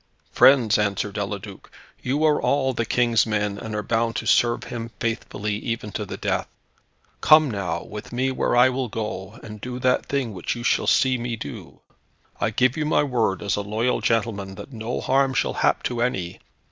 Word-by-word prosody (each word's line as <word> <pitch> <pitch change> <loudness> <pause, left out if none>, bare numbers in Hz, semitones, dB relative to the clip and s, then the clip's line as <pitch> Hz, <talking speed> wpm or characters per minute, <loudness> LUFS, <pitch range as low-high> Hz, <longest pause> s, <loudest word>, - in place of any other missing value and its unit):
"Friends," 120 -6 +5
answered 100 -2 -1
Eliduc, - - -6 0.3
"you 140 +4 0
are 150 -1 +3
all 135 -2 +1
the 115 -1 -2
King's 120 -2 +2
men, 105 -2 -1
and 110 -2 -6
are 105 - -2
bound 115 +2 0
to - - -3
serve 120 -1 +3
him 115 -1 -6
faithfully, 110 -3 -2
even 115 -3 -4
to - - -4
the - - -6
death. - - -1 0.7
Come, 155 -3 +6
now, 90 -5 -3
with 105 0 -9
me 130 +2 0
where 130 - 0
I 125 +1 +7
will 130 -1 -2
go, 105 -1 -5
and 105 -2 -9
do 125 0 -5
that 125 0 +1
thing 135 -6 -1
which 90 +4 -3
you 120 - -6
shall - - +1
see 130 -2 +3
me 120 0 -3
do. 75 -10 -9 0.6
I - - +1
give 130 0 +2
you 155 - -1
my 150 - +3
word 115 -8 0
as 105 +1 0
a 105 - -2
loyal 110 +5 -1
gentleman, 100 -4 -1
that 135 - -10
no 115 +2 -4
harm 135 0 +2
shall - - +1
hap - - +1
to 120 -1 -2
any. 95 -8 -2
115 Hz, 195 wpm, -23 LUFS, 105-125 Hz, 0.7 s, I